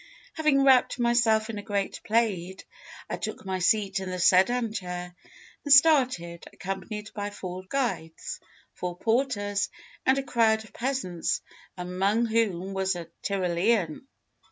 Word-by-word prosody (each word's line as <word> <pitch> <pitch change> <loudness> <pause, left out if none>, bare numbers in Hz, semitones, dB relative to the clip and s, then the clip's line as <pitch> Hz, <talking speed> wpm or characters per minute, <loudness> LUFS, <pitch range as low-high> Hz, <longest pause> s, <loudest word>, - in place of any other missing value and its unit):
Having 305 -4 +3
wrapped 265 -3 +5
myself 235 -3 +3
in 210 - -5
a - - -5
great 200 -2 -3
plaid, 200 -5 0 0.4
I - - -3
took - - -5
my 190 -1 -2
seat 195 +1 +2
in 190 -1 -5
the 185 - -3
sedan 215 +6 +3
chair 180 -3 -5 0.5
and 290 - -3
started, 255 - +4
accompanied 195 +3 -6
by 205 -1 -3
four 185 -2 -7
guides, 235 -12 -3 0.3
four 180 -1 -5
porters, 220 -3 0 0.3
and 265 +1 +3
a 275 - -1
crowd 220 -4 +2
of 220 - -17
peasants, 240 -10 -2 0.4
among 190 +6 0
whom 200 -5 0
was 190 -1 0
a 170 -2 -7
Tyrolean. 185 - 0
205 Hz, 135 wpm, -27 LUFS, 185-235 Hz, 0.5 s, wrapped